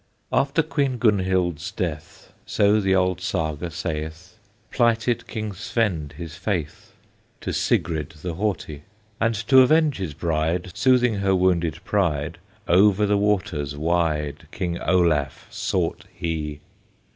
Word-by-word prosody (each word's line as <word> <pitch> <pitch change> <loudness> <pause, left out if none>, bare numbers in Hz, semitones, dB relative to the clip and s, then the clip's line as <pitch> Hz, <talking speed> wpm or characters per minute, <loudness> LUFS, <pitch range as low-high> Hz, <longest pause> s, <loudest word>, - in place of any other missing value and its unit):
After 140 +4 +2
Queen 140 -4 0
Gunhild's 95 -7 +1
death, 80 -5 -5
So 105 +1 +3
the 95 -1 +2
old 90 -1 +1
Saga 80 -3 -2
saith, 80 +3 -5 0.4
Plighted 115 0 +1
King 110 -2 -4
Svend 90 -7 -1
his 85 -2 -8
faith 85 -4 -4 0.5
To - - -3
Sigrid 80 -2 0
the 90 -2 -3
Haughty; 85 -6 -3 0.4
And 115 0 +1
to 130 +2 +7
avenge 150 +2 +4
his 90 -7 -4
bride, 85 +3 -1
Soothing 125 -4 +3
her 100 -1 +2
wounded 85 -3 +1
pride, 85 -9 0 0.3
Over 100 +3 +5
the 105 0 +2
waters 95 -9 0
wide 80 -2 -1
King 85 -1 -3
Olaf 80 -7 +1
sought - - -2
he. 75 -3 -4
90 Hz, 120 wpm, -23 LUFS, 80-105 Hz, 0.5 s, to